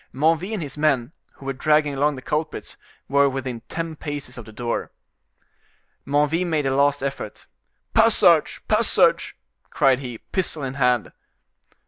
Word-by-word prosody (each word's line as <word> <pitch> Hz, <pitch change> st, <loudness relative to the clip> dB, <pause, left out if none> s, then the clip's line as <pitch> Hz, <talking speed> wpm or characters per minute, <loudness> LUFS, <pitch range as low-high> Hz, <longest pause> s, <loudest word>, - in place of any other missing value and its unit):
Menneville 165 Hz, +8 st, +1 dB
and 185 Hz, -, -3 dB
his 145 Hz, 0 st, -8 dB
men, 140 Hz, -4 st, +1 dB, 0.2 s
who 135 Hz, -, -15 dB
were 135 Hz, -, -2 dB
dragging 150 Hz, +2 st, +2 dB
along 145 Hz, +2 st, +1 dB
the 130 Hz, -, -9 dB
culprits, 155 Hz, +3 st, -3 dB, 0.3 s
were 140 Hz, 0 st, +4 dB
within 130 Hz, -3 st, -4 dB
ten 165 Hz, -1 st, -4 dB
paces 145 Hz, -4 st, -6 dB
of 120 Hz, -, -9 dB
the 110 Hz, -, -12 dB
door. 120 Hz, +2 st, -3 dB, 1.2 s
Menneville 150 Hz, +5 st, +1 dB
made 155 Hz, -4 st, 0 dB
a 135 Hz, 0 st, +1 dB
last 140 Hz, 0 st, +2 dB
effort. 135 Hz, -6 st, -5 dB, 0.5 s
"Passage! -, -, +4 dB
passage!" -, -, +3 dB, 0.3 s
cried 135 Hz, -1 st, +3 dB
he, 125 Hz, -4 st, -6 dB
pistol 160 Hz, -, -2 dB
in 130 Hz, -1 st, -3 dB
hand. 125 Hz, -4 st, +1 dB
140 Hz, 145 wpm, -23 LUFS, 130-150 Hz, 1.2 s, were